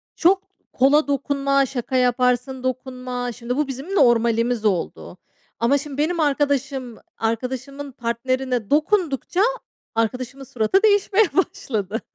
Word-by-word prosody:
çok 375 +3 +3 0.3
kola 285 +4 +4
dokunma, 275 0 +1
şaka 260 0 -4
yaparsın, 250 +1 +1
dokunma 255 -1 -3
Şimdi 240 +2 -4
bu 295 -1 +1
bizim 275 +9 -5
normalimiz 235 - +3
oldu. 185 -2 -2 0.4
Ama 250 +5 +3
şimdi 280 0 -7
benim 325 +4 0
arkadaşım, 280 -4 0 0.2
arkadaşımın 260 +5 -3
partnerine 245 -1 -2
dokundukça 325 +1 +1 0.5
arkadaşımın 250 +4 -2
suratı 245 - +1
değişmeye 410 0 +4
başladı. 240 - -1
260 Hz, 110 wpm, -22 LUFS, 240-285 Hz, 0.5 s, kola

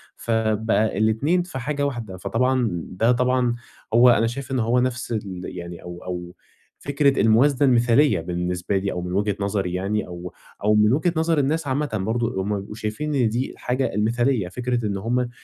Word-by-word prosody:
فبقى 110 -2 0
الاتنين 110 - +2
في 175 -7 -7
حاجة 145 +3 -1
واحدة، 115 -9 -4
فطبعًا 125 +5 +1 0.2
ده 110 +6 +2
طبعًا 125 -1 +2 0.4
هو 120 +2 +7
أنا 115 -1 +4
شايف 130 +3 -6
إن 130 - 0
هو 120 +2 +2
نفْس 125 -1 -2
ال 100 -5 -4
يعني 85 -1 -7
أو 85 0 -9
أو 90 -1 -6 0.5
فكرة 140 -1 +2
الموازنة 130 +5 +4
المثالية 120 - +4
بالنسبة 90 +2 -2
لي 100 +1 -1
أو 90 - -3
من 90 0 -5
وجهة 100 +1 0
نظري 100 -3 -1
يعني 100 +3 -1
أو 90 -1 -8 0.3
أو 105 +1 +4
من 105 +2 +4
وجهة 165 +5 +1
نظر 160 0 +1
الناس 150 +3 0
عامةً 145 +2 -1
برضه 110 0 -1
هُم 105 +2 -1
بيبقوا 100 +2 -9
شايفين 110 +8 -3
إن 125 -5 +3
دي 120 +4 -2
الحاجة 130 +2 -2
المثالية، 115 +1 +1
فكرة 120 +4 -2
إن 100 -2 -1
هُم 120 +4 -1
115 Hz, 180 wpm, -23 LUFS, 100-130 Hz, 0.5 s, هو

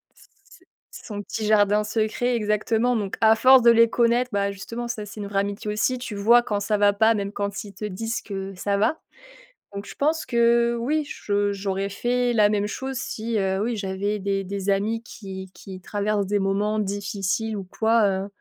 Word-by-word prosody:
S - - -21 0.7
son 205 -2 -6
petit 215 +1 -4
jardin 210 0 +3
secret, 225 +3 0
exactement. 225 +3 +1
Donc 200 -3 -3
à 220 0 +6
force 260 +2 +7
de 235 - +8
les 230 0 +5
connaître, 240 +1 +2
bah, 200 0 0
justement, 230 +5 -6
ça, 215 -2 -4
c'est 210 +1 -9
une 200 - -5
vraie 200 -1 0
amitié 205 +1 -3
aussi. 255 +4 0
Tu 245 -4 -6
vois 230 +4 +5
quand 210 -4 -2
ça 210 +1 0
va 205 0 +4
pas, 220 +2 +4
même 200 -1 -3
quand 200 0 -4
ils 200 - -11
te 210 +3 -6
disent 225 +4 -3
que 195 -1 -6
ça 200 +2 -1
va. 220 +10 +1 0.7
Donc 200 0 -6
je - - -10
pense 310 +3 0
que 235 0 +3
oui, 295 +5 -1
je 205 -8 -1
j'aurais 195 0 -2
fait 245 +4 0
la 210 -2 +4
même 205 -1 0
chose 265 +4 -5
si, 225 -1 -3
heu, 190 -1 0
oui, 235 -1 -2
j'avais 200 +1 -2
des 195 0 -1
des 195 +1 -4
amis 215 +3 0
qui 190 -5 -9
qui 190 -1 -10
traversent 205 +1 -1
des 205 0 +1
moments 200 +2 0
difficiles 205 +1 -2
ou 195 - -4
quoi, 220 +4 +2
heu, 190 +1 -2
210 Hz, 200 wpm, -24 LUFS, 200-230 Hz, 0.7 s, de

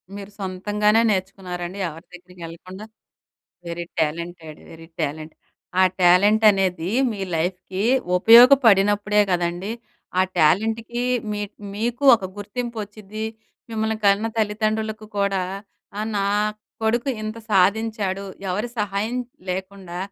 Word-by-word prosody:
మీరు 200 0 -9
సొంతంగానే 210 +3 +1
నేర్చుకున్నారండి, 185 -1 -4
ఎవరి 165 +3 -12
దగ్గరికి 180 0 -14
ఎళ్ళకుండా? 185 +5 -10 0.8
Very 170 0 -4
talented, 160 0 -3
very 165 0 -12
talent. 155 +1 -4 0.5
ఆ - - +7 0.2
టాలెంట్ 200 +5 +5
అనేది 185 -3 -1 0.2
మీ 205 -3 -5 0.2
లైఫ్‌కి 185 +3 -3 0.3
ఉపయోగపడినప్పుడే 210 -2 +6
కదండీ, 175 +3 -1 0.5
ఆ - - +6 0.2
టాలెంట్‌కి 225 +9 +1 0.3
మీ 210 0 -3 0.3
మీకు 235 +5 -2
ఒక 195 - -9
గుర్తింపు 235 +4 -5
వచ్చిద్ది. 210 +1 -8 0.5
మిమ్మల్ని 220 0 -1
కన్న 200 +2 +4
తల్లిదండ్రులకు 215 0 -1
కూడా, 195 -1 +1 0.6
ఆహ్, 215 +1 -2
“నా 200 - +1 0.6
కొడుకు 235 +5 +1
ఇంత 215 +1 -5
సాధించాడు, 200 0 +1 0.3
ఎవరి 210 +6 -2
సహాయం 210 +3 -1 0.3
లేకుండా 185 -1 -6
200 Hz, 105 wpm, -22 LUFS, 180-215 Hz, 0.8 s, ఆ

